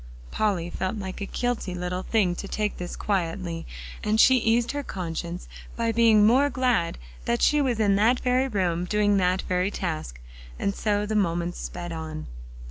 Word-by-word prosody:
Polly 180 Hz, -5 st, 0 dB
felt 185 Hz, +3 st, -2 dB
like 190 Hz, -1 st, -6 dB
a 200 Hz, -, -3 dB
guilty 245 Hz, -7 st, -2 dB
little 180 Hz, +1 st, -3 dB
thing 195 Hz, -4 st, +1 dB
to 200 Hz, -, -6 dB
take 210 Hz, +1 st, -2 dB
this 175 Hz, -1 st, -5 dB
quietly, 170 Hz, -3 st, -2 dB, 0.4 s
and 215 Hz, 0 st, +1 dB
she 260 Hz, +2 st, +7 dB
eased 230 Hz, 0 st, +2 dB
her 285 Hz, -, -3 dB
conscience 175 Hz, -5 st, -5 dB, 0.3 s
by 230 Hz, -1 st, 0 dB
being 225 Hz, -2 st, +5 dB
more 265 Hz, +6 st, +5 dB
glad 250 Hz, -9 st, +1 dB, 0.3 s
that 120 Hz, -, 0 dB
she 300 Hz, 0 st, +4 dB
was 250 Hz, -5 st, 0 dB
in 205 Hz, -2 st, +3 dB
that 230 Hz, +5 st, +3 dB
very 255 Hz, +1 st, +2 dB
room 180 Hz, -6 st, 0 dB
doing 205 Hz, +1 st, +2 dB
that 185 Hz, 0 st, +1 dB
very 180 Hz, +1 st, 0 dB
task. 155 Hz, -, -4 dB, 0.4 s
And 200 Hz, -, -1 dB
so 205 Hz, 0 st, 0 dB
the 215 Hz, -, -3 dB
moments 175 Hz, -3 st, 0 dB
sped 175 Hz, -1 st, -6 dB
on. 160 Hz, -1 st, -5 dB
200 Hz, 175 wpm, -26 LUFS, 175-225 Hz, 0.4 s, she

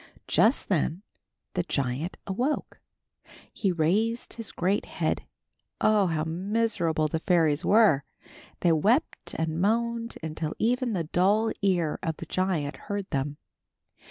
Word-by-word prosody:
Just 230 Hz, +6 st, +3 dB
then 175 Hz, 0 st, 0 dB, 0.5 s
the 180 Hz, -, +1 dB
giant 140 Hz, 0 st, -2 dB
awoke. 245 Hz, +10 st, -2 dB, 0.7 s
He 195 Hz, -, 0 dB
raised 205 Hz, +8 st, 0 dB
his 230 Hz, -2 st, -5 dB
great 190 Hz, +4 st, 0 dB
head. -, -, -2 dB, 0.5 s
Oh, 210 Hz, -3 st, +4 dB
how 160 Hz, -2 st, 0 dB
miserable 175 Hz, -2 st, 0 dB
the 160 Hz, +2 st, -2 dB
fairies 165 Hz, -3 st, +2 dB
were! 200 Hz, -9 st, +5 dB, 0.6 s
They 175 Hz, -, +4 dB
wept 210 Hz, -, +1 dB
and 160 Hz, +1 st, -1 dB
moaned 230 Hz, +3 st, 0 dB
until 155 Hz, 0 st, -3 dB
even 245 Hz, +1 st, +1 dB
the 175 Hz, -4 st, 0 dB
dull 200 Hz, +7 st, +2 dB
ear 175 Hz, -6 st, +1 dB
of 160 Hz, -2 st, -2 dB
the -, -, -7 dB
giant 175 Hz, -6 st, -1 dB
heard 200 Hz, -1 st, -5 dB
them. 140 Hz, +1 st, -2 dB
185 Hz, 130 wpm, -27 LUFS, 160-215 Hz, 0.7 s, were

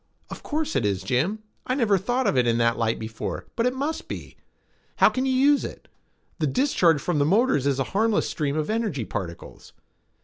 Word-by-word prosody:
"Of -, -, -7 dB
course 310 Hz, -, -3 dB
it 135 Hz, -, +1 dB
is, 100 Hz, -2 st, -1 dB
Jim. 160 Hz, -, 0 dB, 0.2 s
I 255 Hz, -, +1 dB
never 225 Hz, -7 st, +3 dB
thought 245 Hz, +7 st, -1 dB
of -, -, +2 dB
it 125 Hz, -2 st, +3 dB
in 115 Hz, 0 st, +2 dB
that 115 Hz, 0 st, +2 dB
light 115 Hz, -1 st, 0 dB
before, 110 Hz, 0 st, -5 dB
but 235 Hz, +1 st, +1 dB
it 250 Hz, -, 0 dB
must 290 Hz, +4 st, -3 dB
be. -, -, -7 dB, 0.6 s
How -, -, +6 dB
can 260 Hz, +1 st, -1 dB
you -, -, +1 dB
use 280 Hz, +2 st, +4 dB
it? -, -, -8 dB, 0.5 s
The 155 Hz, -, +1 dB
discharge 170 Hz, -, +2 dB
from 155 Hz, +1 st, -1 dB
the -, -, +4 dB
motors 170 Hz, -, +2 dB
is 140 Hz, -2 st, +1 dB
a 135 Hz, -, +1 dB
harmless 220 Hz, +2 st, +2 dB
stream 150 Hz, -1 st, -2 dB
of 155 Hz, -, -1 dB
energy 215 Hz, -, -1 dB
particles." 90 Hz, -5 st, -7 dB
165 Hz, 205 wpm, -25 LUFS, -, 0.6 s, How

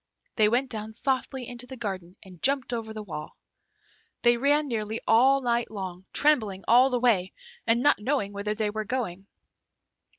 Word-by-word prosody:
They 215 Hz, -2 st, +4 dB
went 250 Hz, +3 st, 0 dB
down 220 Hz, -1 st, -5 dB
softly 260 Hz, +1 st, -2 dB
into 245 Hz, 0 st, -7 dB
the 260 Hz, -, -8 dB
garden 190 Hz, -5 st, -5 dB
and 185 Hz, -3 st, -15 dB
jumped 270 Hz, -2 st, +1 dB
over 225 Hz, -2 st, -4 dB
the 215 Hz, -1 st, -6 dB
wall. 160 Hz, -6 st, -7 dB, 0.9 s
They 240 Hz, 0 st, +5 dB
ran 290 Hz, +4 st, +2 dB
nearly 220 Hz, -3 st, -3 dB
all 265 Hz, +5 st, +5 dB
night 240 Hz, -1 st, 0 dB
long, 190 Hz, -3 st, -6 dB
trembling 220 Hz, -11 st, +2 dB
all 250 Hz, +3 st, +6 dB
the 250 Hz, -2 st, 0 dB
way, 205 Hz, -7 st, +2 dB, 0.3 s
and 235 Hz, +2 st, +3 dB
not 290 Hz, -, +4 dB
knowing 210 Hz, -3 st, -1 dB
whither 205 Hz, +1 st, -3 dB
they 215 Hz, -1 st, -1 dB
were 215 Hz, +1 st, -3 dB
going. 200 Hz, -5 st, -4 dB
230 Hz, 170 wpm, -27 LUFS, 205-255 Hz, 0.9 s, all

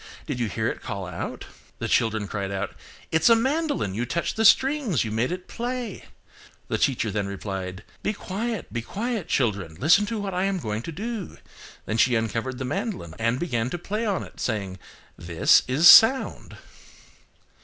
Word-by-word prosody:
Did 140 Hz, -5 st, -4 dB
you 120 Hz, -, 0 dB
hear 110 Hz, +3 st, -2 dB
it -, -, -3 dB
call 100 Hz, -1 st, -5 dB
out?" 90 Hz, -1 st, -6 dB, 0.3 s
The -, -, -3 dB
children 110 Hz, -3 st, +1 dB
cried 100 Hz, -1 st, -3 dB
out–"It's 100 Hz, -, -2 dB
a 230 Hz, -, +8 dB
mandolin, 280 Hz, -, 0 dB
you 115 Hz, +5 st, -2 dB
touched 170 Hz, +6 st, -2 dB
the 225 Hz, -, +1 dB
strings, 260 Hz, -, +4 dB
you 110 Hz, -, -4 dB
made 115 Hz, +6 st, 0 dB
it 180 Hz, 0 st, -5 dB
play." 240 Hz, -3 st, -5 dB, 0.6 s
The -, -, -1 dB
teacher 120 Hz, -5 st, +1 dB
then 100 Hz, -1 st, -2 dB
replied, 95 Hz, -1 st, -5 dB, 0.2 s
"Be -, -, 0 dB
quiet, 215 Hz, +1 st, -4 dB
be 120 Hz, -, -2 dB
quiet, 215 Hz, -, -3 dB
children. 100 Hz, -, 0 dB
Listen 185 Hz, -, +4 dB
to 225 Hz, +2 st, -3 dB
what 200 Hz, -2 st, -4 dB
I 180 Hz, +1 st, 0 dB
am 195 Hz, -1 st, 0 dB
going 110 Hz, -9 st, -3 dB
to 165 Hz, -, -6 dB
do." 215 Hz, +4 st, -5 dB, 0.5 s
Then 110 Hz, -, -2 dB
she 120 Hz, +1 st, +4 dB
uncovered 115 Hz, +3 st, -2 dB
the 130 Hz, -, -4 dB
mandolin 150 Hz, -, -4 dB
and 115 Hz, +3 st, +1 dB
began 120 Hz, -8 st, -1 dB
to 175 Hz, -, -3 dB
play 210 Hz, +6 st, -3 dB
on 205 Hz, -5 st, -1 dB
it, -, -, -13 dB
saying, 100 Hz, -5 st, -3 dB, 0.4 s
"This 85 Hz, 0 st, +4 dB
is 140 Hz, +7 st, +5 dB
sound." 245 Hz, +8 st, +6 dB
130 Hz, 175 wpm, -25 LUFS, -, 0.6 s, a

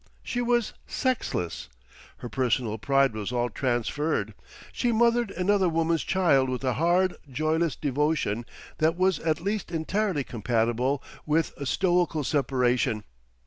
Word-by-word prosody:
She 245 Hz, -, -2 dB
was 240 Hz, -2 st, +1 dB
sexless, 90 Hz, -, -2 dB, 0.5 s
her -, -, -7 dB
personal 120 Hz, -3 st, 0 dB
pride 135 Hz, 0 st, +3 dB
was 110 Hz, +1 st, -4 dB
all 120 Hz, -1 st, 0 dB
transferred, 120 Hz, -1 st, -1 dB, 0.4 s
she 245 Hz, -, 0 dB
mothered 235 Hz, 0 st, +3 dB
another 190 Hz, 0 st, +2 dB
woman's 165 Hz, 0 st, +1 dB
child 150 Hz, -9 st, +3 dB
with 130 Hz, +1 st, -3 dB
a 130 Hz, -1 st, +1 dB
hard, 175 Hz, +4 st, +2 dB
joyless 155 Hz, +3 st, 0 dB
devotion 145 Hz, -5 st, -1 dB, 0.3 s
that 160 Hz, +2 st, +2 dB
was 185 Hz, -3 st, +2 dB
at 160 Hz, -1 st, -1 dB
least 200 Hz, +2 st, -2 dB
entirely 175 Hz, 0 st, 0 dB
compatible 120 Hz, +3 st, 0 dB, 0.2 s
with 155 Hz, +1 st, +1 dB
a 140 Hz, -, -5 dB
stoical 175 Hz, -2 st, +1 dB
separation. 125 Hz, -6 st, +1 dB
150 Hz, 130 wpm, -27 LUFS, 125-180 Hz, 0.5 s, pride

